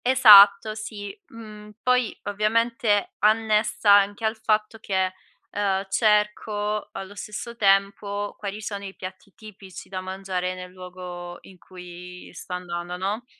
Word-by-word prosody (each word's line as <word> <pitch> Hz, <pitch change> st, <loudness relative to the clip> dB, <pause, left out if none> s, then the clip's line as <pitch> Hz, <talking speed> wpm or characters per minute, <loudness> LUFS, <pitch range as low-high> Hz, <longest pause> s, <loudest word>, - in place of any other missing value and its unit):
Esatto, 215 Hz, -5 st, +8 dB
sì. 205 Hz, -2 st, -7 dB
Mhmm, 210 Hz, -2 st, -12 dB
poi 250 Hz, -2 st, +1 dB
ovviamente 215 Hz, +1 st, 0 dB
annessa 215 Hz, 0 st, +2 dB
anche 205 Hz, +2 st, +4 dB
al 220 Hz, +1 st, 0 dB
fatto 220 Hz, 0 st, -1 dB
che, 190 Hz, -3 st, -1 dB, 0.4 s
ehm, 195 Hz, -1 st, -1 dB
cerco 210 Hz, 0 st, 0 dB
allo 195 Hz, +1 st, -7 dB
stesso 210 Hz, +4 st, -7 dB
tempo 200 Hz, 0 st, +1 dB
quali 205 Hz, +1 st, -6 dB
sono 200 Hz, -2 st, -5 dB
i 195 Hz, -1 st, -8 dB
piatti 185 Hz, +2 st, -10 dB
tipici 200 Hz, -4 st, -12 dB
da 185 Hz, -1 st, -5 dB
mangiare, 185 Hz, -1 st, -4 dB
nel 180 Hz, 0 st, -9 dB
luogo 180 Hz, -1 st, -9 dB
in 185 Hz, -2 st, -17 dB
cui 180 Hz, 0 st, -12 dB
sto 180 Hz, -, -9 dB
andando, 175 Hz, 0 st, -5 dB
no, 205 Hz, +6 st, -3 dB
205 Hz, 130 wpm, -24 LUFS, 185-215 Hz, 0.4 s, Esatto